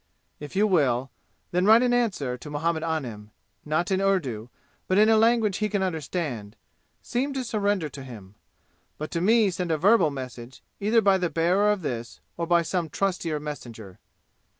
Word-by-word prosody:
"If 150 +4 -9
you 205 +2 +4
will, 135 - +1 0.4
then 180 +1 +1
write 225 +3 +7
an 245 -1 +2
answer 190 - 0
to 125 +4 -10
Muhammad 160 +2 -1
Anim, 125 -11 -4 0.4
not 155 +5 -1
in 190 0 +1
Urdu, 135 - -1 0.4
but 185 - +1
in 215 +1 +6
a 225 - +5
language 220 -2 +3
he 215 0 -1
can 200 -2 0
understand; 150 - -4 0.5
seem 270 +4 -2
to 265 -1 -2
surrender 205 -7 0
to 140 - -10
him. 105 -7 -11 0.6
But 155 - -6
to 170 - -2
me 215 +1 +4
send 175 0 -3
a 160 - +1
verbal 190 -1 +4
message, 130 -2 -8 0.2
either 220 +3 +3
by 195 -1 +4
the 180 -2 0
bearer 180 +6 +2
of 205 -4 -2
this 120 -5 -5 0.2
or 170 0 -3
by 170 0 +3
some 165 0 -2
trustier 175 -5 -1
messenger. 115 -10 -8
170 Hz, 175 wpm, -25 LUFS, 140-205 Hz, 0.6 s, write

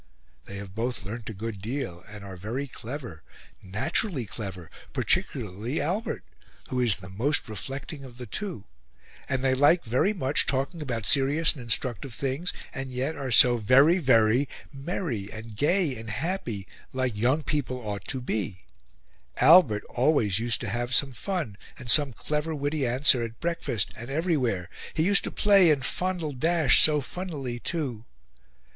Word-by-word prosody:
They 100 - -9
have 100 -2 -8
both 120 +2 -3
learnt 110 +3 -6
a - - -5
good 105 -1 -5
deal, 105 -6 -4
and 105 -2 -10
are 95 -1 -8
very 110 +10 -4
clever, 125 - -8 0.4
naturally 130 - -1
clever, 95 -5 -7 0.2
particularly 110 - -1
Albert, 190 +8 -2 0.5
who 130 - -1
is 120 -6 +5
the 90 0 -11
most 125 +11 0
reflecting 135 - -6
of 125 -3 -12
the 125 - -7
two, 175 - -5 0.6
and 130 -1 -1
they 130 -1 +3
like 145 +6 +4
very 125 - +2
much 145 -8 0
talking 140 +5 -1
about 120 -7 -3
serious 145 +7 +4
and 135 - -9
instructive 120 +1 -1
things 140 +8 -2 0.2
and 135 -1 -5
yet 130 +5 -2
are 135 -2 -4
so 120 +1 +7
VERY 135 - +5
VERY 125 -1 +3 0.2
merry 135 - -4
and 110 0 -9
gay 155 - +2
and 110 -1 -8
happy, 120 - -3 0.3
like 130 -3 -1
young 130 +8 +1
people 140 -5 -2
ought 105 -4 -5
to 130 - -2
be; 105 -6 -3 0.8
Albert 135 - +6
always 120 -7 +2
used 115 0 -1
to 115 - -3
have 120 +4 -1
some 140 -2 +4
fun 140 - -4 0.2
and 125 -3 0
some 145 -3 +6
clever 150 +6 -3
witty 145 -1 -1
answer 130 +1 +4
at 115 0 -5
breakfast 165 - -1
and 115 +3 -9
everywhere; 135 - 0 0.3
he 160 - +2
used 195 +3 +4
to - - -2
play 200 -4 +5
and 140 -3 +2
fondle 180 -3 -2
Dash 160 +1 +4
so 150 -1 +5
funnily 140 -7 -5
too... 125 -8 -3
130 Hz, 160 wpm, -27 LUFS, 110-150 Hz, 0.8 s, so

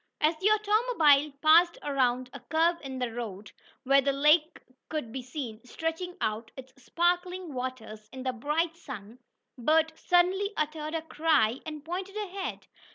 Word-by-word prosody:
As 310 +2 +3
the 395 - +3
automobile 415 - +3
passed 335 +3 +6
around 255 -3 0
a 275 - -7
curve 330 +5 +1
in 265 -2 -6
the 250 -2 -2
road, 210 -4 -6 0.3
where 275 +1 +5
the 275 +1 +1
lake 300 +4 +3 0.3
could 300 -8 -4
be 260 +2 -4
seen 245 -3 -7
stretching 325 +7 -4
out 220 +1 -2
its 260 0 -11
sparkling 355 +2 -1
waters 225 -4 -6
in 260 0 -8
the 255 -1 -1
bright 305 +7 -1
sun, 220 - -10 0.4
Bert 320 +5 +3
suddenly 370 +5 +2
uttered 305 +1 -2
a 320 - -2
cry, 300 -7 +2
and 305 -2 -7
pointed 375 +4 -5
ahead. 395 -2 -5
305 Hz, 155 wpm, -28 LUFS, 255-345 Hz, 0.4 s, passed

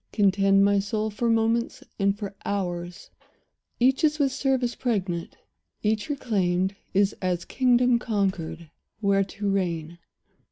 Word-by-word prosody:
Contend, 195 -1 +4
my 200 0 +3
soul, 215 +1 -2
for 235 +3 -1
moments 230 +1 +1 0.2
and 200 0 +2
for 200 -2 -6
hours; 180 -1 -4 0.7
Each 265 +5 +3
is 305 -1 +3
with 280 -3 +2
service 260 -3 0
pregnant; 190 -9 -2 0.5
each 215 +4 0
reclaimed 195 -8 0 0.2
Is 200 +1 +2
as 180 -2 -1
a - - -16
kingdom 245 -1 +3
conquered, 180 -8 -2 0.3
where 200 -2 +2
to 200 +1 -5
reign. 170 -4 -2
200 Hz, 130 wpm, -25 LUFS, 190-235 Hz, 0.7 s, Contend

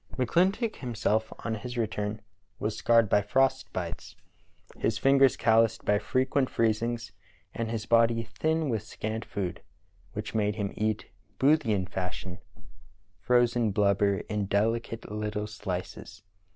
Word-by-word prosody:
McCHntock 185 - +1
himself, 110 -3 -1
on 115 - -1
his 120 +3 -6
return, 105 -2 -2 0.3
was 105 0 -2
scarred 115 -1 +4
by 105 - +3
frost 135 +6 +1
bites, - - -5 0.6
his 110 0 0
fingers 135 +2 +4
calloused 115 0 +3
by 105 0 +3
frequent 130 +4 +1
freezings, 115 0 0 0.4
and 115 -1 -3
his 110 -1 -3
body 115 0 +3
thin 155 +8 -1
with 110 -4 0
scant 110 0 -5
food, 95 -5 -4 0.5
which - - -5
made 105 -1 +1
him 100 -3 -3
eat, 110 -1 -2 0.3
Boothian 130 -9 +3
fashion, 90 0 -5 0.8
"frozen 120 -2 +3
blubber 100 -1 +2
in 105 -2 -2
delicate 115 +2 -1
little 105 0 -3
slices." 95 -4 -6
110 Hz, 125 wpm, -28 LUFS, 105-120 Hz, 0.8 s, scarred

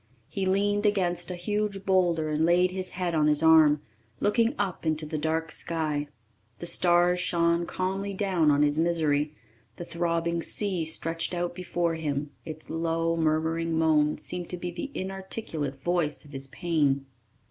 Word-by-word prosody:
He 195 -1 -2
leaned 205 +2 +2
against 175 -4 0
a 180 - -3
huge 200 +2 -2
boulder 175 -4 +2
and 155 +1 0
laid 175 +2 +4
his 185 0 -3
head 180 -2 -1
on 155 -2 +3
his 150 +1 +3
arm, 155 -2 +6 0.4
looking 230 +5 +2
up 190 -3 -2
into 155 -1 0
the 155 0 -3
dark 160 +1 -1
sky. 155 -3 -2 0.5
The - - -7
stars 175 0 +4
shone 170 -1 +1
calmly 195 +2 -2
down 185 -6 +2
on 145 0 +4
his 145 +1 +1
misery; 155 -3 +1 0.4
the 175 - -7
throbbing 170 0 -1
sea 185 -3 -1
stretched 165 +2 -2
out 175 0 -2
before 175 -1 -1
him; 145 -2 -3
its 155 0 -8
low, 165 0 0
murmuring 160 +1 0
moan 155 -2 +3
seemed 180 -1 -6
to 180 - -4
be 175 0 -4
the 275 - -5
inarticulate 190 -7 -3
voice 170 -4 0
of 145 - -15
his 135 -1 -5
pain. 145 -3 0
170 Hz, 160 wpm, -27 LUFS, 155-180 Hz, 0.5 s, arm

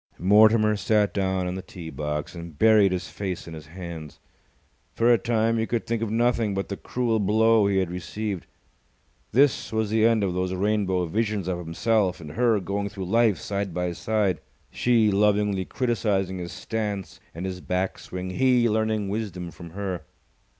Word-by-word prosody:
Mortimer 105 +3 +5
sat 105 -1 +1
down 95 -2 0
on 90 - -2
the 95 - -4
tee 85 -3 -9
box, 75 0 -4
and 85 -3 -9
buried 110 -2 +5
his 90 0 -2
face 95 -4 -5
in 85 - -8
his 80 -2 -9
hands. 85 -3 -8 0.8
For 120 +1 +4
a 115 - +3
time 115 -1 +1
he 110 - 0
could 120 -2 -1
think 115 -1 -2
of 115 - -1
nothing 115 -2 +1
but 95 - -3
the 100 - -3
cruel 115 +1 -1
blow 110 +1 +4
he 100 -1 +1
had 95 -2 0
received. 95 +1 -4 0.8
This 135 +3 +3
was 110 -1 -1
the 110 0 +3
end 115 -2 +4
of 95 -3 0
those 90 +1 -1
rainbow 95 -2 +1
visions 105 +1 -1
of 90 -1 -1
himself 95 +3 0
and 75 -3 -9
her 115 +3 +2
going 100 +2 -3
through 100 -2 -6
life 110 0 +3
side 100 -1 -3
by 90 0 -1
side, 100 -1 0 0.3
she 115 -3 +3
lovingly 100 -1 +2
criticizing 100 -7 -1
his 85 -1 -6
stance 105 -4 -4 0.2
and 85 +3 -5
his 90 -1 -5
back 90 +1 -2
swing, 90 0 -6
he 125 +2 +3
learning 110 -1 0
wisdom 95 -4 -4
from 85 0 -11
her. 95 -1 -4
100 Hz, 180 wpm, -25 LUFS, 90-110 Hz, 0.8 s, Mortimer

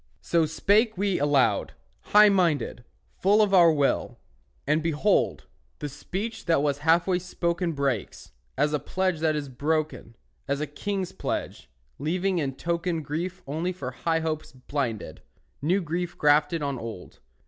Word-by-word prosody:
So 165 -2 +2
spake 205 +7 +2
we 195 -1 0
aloud, 135 -8 +2 0.3
high 210 0 +7
minded, 165 - +1 0.4
Full 205 +3 +4
of 210 -2 +3
our 170 -3 +7
will; 145 -3 0 0.5
and 150 +2 +2
behold, 165 +5 +1 0.3
The 150 - -5
speech 210 - -5
that 165 -4 +2
was 145 -1 0
halfway 170 +4 +3
spoken 175 -1 -2
Breaks, 135 -7 -3 0.3
as 150 +2 +2
a 150 - +1
pledge 185 +3 -1
that 155 -1 +1
is 150 -1 -3
broken, 140 -3 -2 0.3
As 140 - -1
a 150 - -1
king's 190 +5 -4
pledge, 190 - -4 0.3
leaving 180 +5 0
in 135 -4 -2
token 170 +1 -2
Grief 175 +6 -4
only 160 +6 -2
for 175 -8 -6
high 165 +5 -1
hopes 155 -1 -3
blinded, 130 -3 -4 0.4
New 180 +7 +2
grief 175 +2 -3
grafted 150 +2 +3
on 140 -3 -2
old. 115 -6 -8
160 Hz, 150 wpm, -26 LUFS, 145-180 Hz, 0.5 s, high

